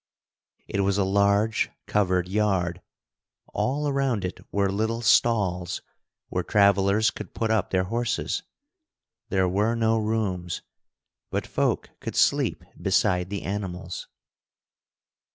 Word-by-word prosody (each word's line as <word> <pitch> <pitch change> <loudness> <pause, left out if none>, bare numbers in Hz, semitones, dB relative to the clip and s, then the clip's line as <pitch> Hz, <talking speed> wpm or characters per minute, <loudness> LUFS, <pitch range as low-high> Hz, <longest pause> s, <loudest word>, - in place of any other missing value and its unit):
It 100 - -2
was 100 0 +2
a 100 - +3
large 100 +3 +2 0.2
covered 95 -3 +1
yard. 95 -3 0 0.7
All 145 +3 0
around 135 -8 0
it 90 - -5
were 100 -1 +1
little 110 +3 -1
stalls 95 -8 +2 0.5
where - - -1
travelers 100 +1 +3
could - - -9
put 115 -1 0
up 110 -4 +1
their 95 -1 +2
horses. 115 +4 -1 0.9
There 95 -1 +2
were 105 +5 +1
no 115 -1 +2
rooms, 100 -6 -2 0.7
but - - -2
folk - - -1
could - - -6
sleep - - +2 0.2
beside 90 0 +2
the 100 -1 -4
animals. 95 -3 -4
100 Hz, 115 wpm, -26 LUFS, 95-110 Hz, 0.9 s, a